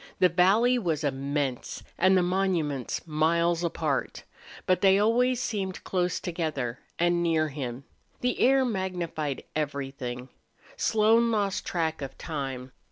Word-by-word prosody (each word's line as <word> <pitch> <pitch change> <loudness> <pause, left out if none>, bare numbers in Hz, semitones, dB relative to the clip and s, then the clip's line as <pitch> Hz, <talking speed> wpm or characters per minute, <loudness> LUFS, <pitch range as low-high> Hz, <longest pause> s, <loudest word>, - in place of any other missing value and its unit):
The 180 - +5
valley 205 +9 +4
was 160 -7 -1
immense 140 -1 -2
and 190 0 +4
the 180 - +3
monuments 175 -9 -1
miles 170 +2 +1
apart. 155 -4 -2 0.4
But 185 - +2
they 195 0 +6
always 240 +4 +3
seemed 195 -7 -3
close 180 -1 -1
together 155 -8 -3 0.2
and 175 0 +2
near 160 -2 +1
him. 135 -3 -5 0.4
The 250 0 0
air 265 +1 +4
magnified 175 - -3
everything. 135 -4 -4 0.5
Slone 225 +2 +3
lost 205 -3 -1
track 160 -3 -1
of 135 - -6
time. 135 -5 -5
170 Hz, 125 wpm, -27 LUFS, 145-190 Hz, 0.5 s, they